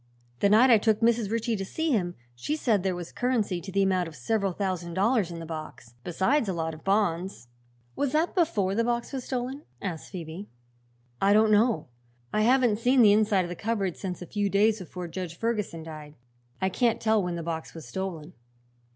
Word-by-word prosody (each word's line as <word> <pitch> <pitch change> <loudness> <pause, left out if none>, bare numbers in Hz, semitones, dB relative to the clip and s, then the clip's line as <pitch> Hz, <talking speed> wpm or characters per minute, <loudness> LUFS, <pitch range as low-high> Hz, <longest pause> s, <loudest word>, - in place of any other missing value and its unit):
The 200 - +3
night 235 +5 +6
I 225 - +7
took 220 0 +2
Mrs. 230 -2 +2
Ritchie 230 +1 0
to 195 - -3
see 320 +11 -2
him 180 -8 0 0.2
she 120 - -3
said 225 -10 +1
there 185 -1 -1
was 175 -1 -7
currency 220 -8 0
to 190 - -8
the 195 +1 +2
amount 185 -2 +1
of 160 - -10
several 195 - 0
thousand 180 -3 -3
dollars 205 -1 +2
in 170 - -7
the 165 - -7
box, 155 -7 -8
besides 200 - +1
a - - 0
lot 160 -1 -2
of 155 - -12
bonds." 190 - 0 0.5
"Was 280 - 0
that 315 +3 +1
before 220 - +1
the 230 +3 +1
box 240 +2 -2
was 260 -2 -4
stolen?" 260 +2 -3 0.2
asked 175 -5 -5
Phoebe. 175 +2 -7 0.7
"I 200 +1 +5
don't 215 +1 +5
know. 215 -5 +3 0.5
I 215 - +2
haven't 240 -2 +3
seen 250 +1 +4
the 205 -2 +7
inside 210 -3 +3
of - - -7
the 175 - -5
cupboard 200 -3 -1
since 180 -2 -5
a - - -8
few 205 +3 -1
days 215 +2 +3
before 180 0 -7
Judge 170 -1 -6
Ferguson 210 -7 -2
died. 155 -2 -9 0.4
I 190 - +1
can't 230 +3 +1
tell 220 -1 +2
when 180 -2 -2
the 170 - -4
box 160 0 -5
was 160 -6 -9
stolen." 175 +2 -5
200 Hz, 205 wpm, -27 LUFS, 175-230 Hz, 0.7 s, I